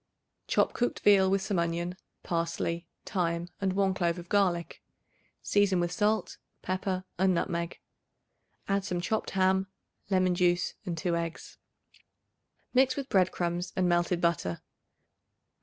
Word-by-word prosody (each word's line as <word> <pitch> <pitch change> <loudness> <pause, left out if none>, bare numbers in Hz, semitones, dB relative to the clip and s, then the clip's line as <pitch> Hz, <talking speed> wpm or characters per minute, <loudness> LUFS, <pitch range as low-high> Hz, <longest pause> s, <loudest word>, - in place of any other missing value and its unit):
Chop - - +2
cooked 245 - -1
veal 195 -2 +6
with 195 0 +1
some 190 -3 0
onion, 170 +1 -1 0.3
parsley, 170 0 -2 0.2
thyme 170 -3 -1
and 190 -1 +1
1 195 0 +2
clove 175 -2 0
of 175 0 -9
garlic; 180 -5 +1 0.6
season 200 -3 +3
with 175 0 0
salt, 215 +3 0 0.2
pepper 185 0 -2 0.2
and 190 -1 +3
nutmeg. 170 0 -2 0.9
Add 195 0 +1
some 180 -3 -2
chopped 220 +5 -1
ham, 190 0 +3 0.4
lemon 185 -2 +3
juice 175 0 +2
and 170 -2 -2
2 170 +1 0
eggs. 170 -1 -5 1.1
Mix 260 0 +4
with 275 -1 -4
bread 185 -2 +3
crumbs 175 +1 -2
and 185 -1 +2
melted 175 0 +2
butter. 170 - 0
180 Hz, 135 wpm, -29 LUFS, 170-195 Hz, 1.1 s, veal